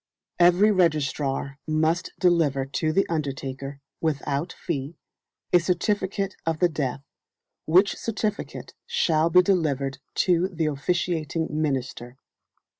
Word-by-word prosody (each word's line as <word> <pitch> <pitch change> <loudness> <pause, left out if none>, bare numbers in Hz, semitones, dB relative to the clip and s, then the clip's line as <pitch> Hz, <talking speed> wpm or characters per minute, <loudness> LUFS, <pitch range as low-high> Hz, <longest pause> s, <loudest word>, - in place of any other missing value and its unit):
Every 180 +5 +6
registrar 145 -6 0
must 160 +3 +1
deliver 160 -7 +2
to 135 +4 -1
the 195 +5 +2
undertaker, 140 -3 -4 0.2
without 150 +1 -1
fee, 150 -1 -5 0.6
a 175 - +8
certificate 195 +2 -1
of 165 -1 -1
the 175 +2 +3
death, 140 -4 -3 0.6
which 185 +6 +4
certificate 215 -2 -4
shall 165 - +2
be 180 +2 +6
delivered 140 -8 0 0.3
to 180 0 +3
the 170 -4 -2
officiating 160 +1 -1
minister. 130 -5 -2
160 Hz, 110 wpm, -25 LUFS, 140-180 Hz, 0.6 s, a